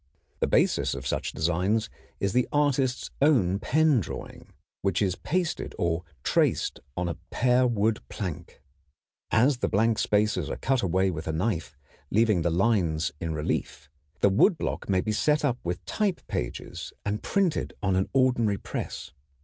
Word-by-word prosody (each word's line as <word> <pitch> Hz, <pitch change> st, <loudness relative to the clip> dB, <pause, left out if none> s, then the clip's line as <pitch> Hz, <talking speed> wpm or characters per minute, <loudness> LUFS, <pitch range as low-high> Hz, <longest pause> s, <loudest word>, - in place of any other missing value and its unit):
The -, -, +1 dB
basis -, -, +2 dB
of 65 Hz, 0 st, -7 dB
such -, -, -1 dB
designs 90 Hz, +8 st, 0 dB, 0.3 s
is 100 Hz, -1 st, 0 dB
the 125 Hz, 0 st, +2 dB
artist's 140 Hz, -3 st, +1 dB
own 100 Hz, -, +3 dB
pen 155 Hz, 0 st, +3 dB
drawing, 95 Hz, -, -7 dB, 0.3 s
which 95 Hz, -3 st, +1 dB
is 95 Hz, -3 st, +1 dB
pasted 175 Hz, -, -2 dB
or 85 Hz, -2 st, 0 dB, 0.2 s
traced -, -, +1 dB, 0.2 s
on 90 Hz, 0 st, 0 dB
a 85 Hz, -, -3 dB
pear 125 Hz, 0 st, +3 dB
wood 110 Hz, -1 st, +1 dB
plank. 90 Hz, -8 st, -6 dB, 0.7 s
All 120 Hz, +6 st, +5 dB
the 125 Hz, -, -1 dB
blank 110 Hz, +2 st, +2 dB
spaces 105 Hz, +1 st, +1 dB
are -, -, -2 dB
cut 135 Hz, -2 st, +1 dB
away 95 Hz, +1 st, +1 dB
with 80 Hz, -2 st, -6 dB
a -, -, 0 dB
knife, 85 Hz, -3 st, -2 dB, 0.3 s
leaving 110 Hz, -4 st, +3 dB
the 85 Hz, -, +1 dB
lines 85 Hz, -4 st, +1 dB
in 80 Hz, -1 st, -3 dB
relief. 75 Hz, -2 st, -3 dB, 0.3 s
This 100 Hz, -, +5 dB
wood 165 Hz, -, +4 dB
block -, -, -4 dB
may 95 Hz, -1 st, +3 dB
be 110 Hz, -, -2 dB
set 150 Hz, +7 st, +2 dB
up 125 Hz, -3 st, 0 dB
with 85 Hz, 0 st, -4 dB
type 205 Hz, -4 st, -1 dB
pages -, -, -5 dB
and 105 Hz, +1 st, -1 dB
printed 190 Hz, -5 st, 0 dB
on 95 Hz, -1 st, +2 dB
an 95 Hz, +1 st, +1 dB
ordinary 125 Hz, -6 st, +2 dB
press. -, -, -6 dB
105 Hz, 160 wpm, -27 LUFS, 90-125 Hz, 0.7 s, All